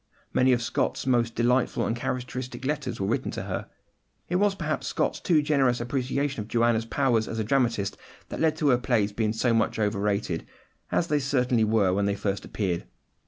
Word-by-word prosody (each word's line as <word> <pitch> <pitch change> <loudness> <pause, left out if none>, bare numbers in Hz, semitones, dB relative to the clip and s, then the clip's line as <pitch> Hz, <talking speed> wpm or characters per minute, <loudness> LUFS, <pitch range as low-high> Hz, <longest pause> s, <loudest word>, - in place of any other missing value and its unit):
Many 130 +1 +4
of 120 -1 +2
Scott's - - -1
most 120 -3 +1
delightful 120 +2 +2
and 115 - -1
characteristic 125 0 -4
letters 150 0 -2
were 95 - 0
written 120 +6 -1
to - - -4
her. - - -4 0.6
It 180 - +1
was 200 0 +2
perhaps 155 -4 -2
Scott's - - -1
too 155 -4 +2
generous 135 -5 +2
appreciation 130 +1 -1
of 105 - -7
Joanna's 115 -1 +2
powers 115 -3 +1
as 115 - -4
a 110 - 0
dramatist 115 -4 0 0.3
that - - -5
led 160 -1 +2
to 150 -2 +1
her 125 -2 +4
plays 115 -4 +1
being 110 0 0
so 115 +2 +1
much 115 -1 +1
overrated, 105 -4 -1 0.4
as 175 - +2
they 150 -3 +1
certainly 125 -4 +1
were 105 -4 +3
when 100 +1 +1
they 100 - 0
first 100 -1 -2
appeared. 90 -5 -2
120 Hz, 190 wpm, -26 LUFS, 110-135 Hz, 0.6 s, Many